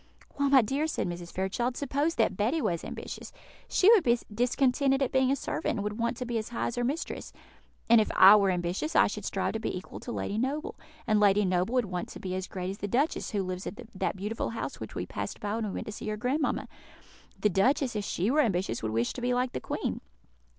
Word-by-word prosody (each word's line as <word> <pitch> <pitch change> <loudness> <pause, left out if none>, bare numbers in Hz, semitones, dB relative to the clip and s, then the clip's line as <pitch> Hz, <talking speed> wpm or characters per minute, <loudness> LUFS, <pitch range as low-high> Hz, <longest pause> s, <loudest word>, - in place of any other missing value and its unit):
"Why, 280 0 +1
my 270 -3 +6
dear," 275 +8 0
said 305 - -2
Mrs. 175 0 -6
Fairchild, 235 +7 -1
"suppose 285 +4 0
that - - +2
Betty 230 - +1
was 170 - -1
ambitious, - - -7 0.4
she 370 - +3
would 435 -7 +6
be 240 0 +4 0.2
discontented 265 +3 +2
at 260 - -1
being 265 -1 +3
a - - +3
servant, 280 - -2
and 200 - -2
would 210 +2 -4
want 235 0 0
to 250 - -4
be 235 -2 -1
as 215 - -6
high 235 - -2
as - - -2
her 245 - -1
mistress; 285 +7 -3 0.6
and 230 -1 +7
if 215 - -1
I 195 +3 +10
were 200 -2 +4
ambitious, 180 - -1
I - - +7
should - - -4
strive - - -1
to 220 - -2
be 220 - -3
equal 185 - -9
to 240 - -7
Lady 210 -2 -2
Noble; 285 +7 -2 0.3
and 215 -1 +3
Lady 205 0 +4
Noble 185 +6 +1
would 250 -3 +3
want 180 -2 -4
to - - -9
be 185 -1 -4
as 185 0 -3
great 185 0 -4
as 195 - -8
the 205 - -3
duchess, 270 +10 0
who 200 -2 -1
lives 185 0 -4
at 210 - -7
that 190 - -1
beautiful 210 +4 -3
house 230 - -5
which - - -8
we - - -2
passed - - -5
by 205 0 -3
when 225 0 -1
we - - -4
went - - -4
to - - -5
see 210 - -7
your 215 0 -2
grandmamma; 270 +7 0 0.7
the 210 - +3
duchess, 255 - +2
if 210 - -1
she 200 +2 0
were 305 +2 +4
ambitious, 185 - 0
would 110 - -2
wish 115 +2 0
to 250 - -7
be 245 0 +1
like 250 0 0
the - - -4
Queen." - - -3
225 Hz, 250 wpm, -29 LUFS, 195-260 Hz, 0.7 s, I